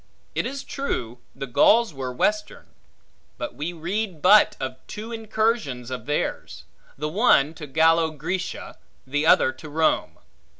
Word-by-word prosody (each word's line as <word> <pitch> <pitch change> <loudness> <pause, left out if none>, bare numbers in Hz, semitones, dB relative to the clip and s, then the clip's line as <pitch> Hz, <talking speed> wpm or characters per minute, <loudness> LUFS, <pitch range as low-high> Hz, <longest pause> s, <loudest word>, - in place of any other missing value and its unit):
It - - -1
is 275 +1 -5
true, 125 - -4 0.2
the - - -5
Gauls 215 - +4
were 130 -2 -4
western; 210 +11 -1 0.7
but - - -5
we 150 +7 -4
read 175 +2 -3
but 210 +4 +5
of 130 -1 -4
two 220 +2 -7
incursions 220 - -1
of 130 - -6
theirs: 150 - -3 0.3
the 150 +2 -2
one 160 - +3
to 155 -2 -9
Gallo 160 +3 +3
Grecia, 165 +5 -5 0.3
the 145 +4 -1
other 130 - +5
to 130 +4 -12
Rome. 160 +2 0
160 Hz, 140 wpm, -24 LUFS, 135-210 Hz, 0.7 s, but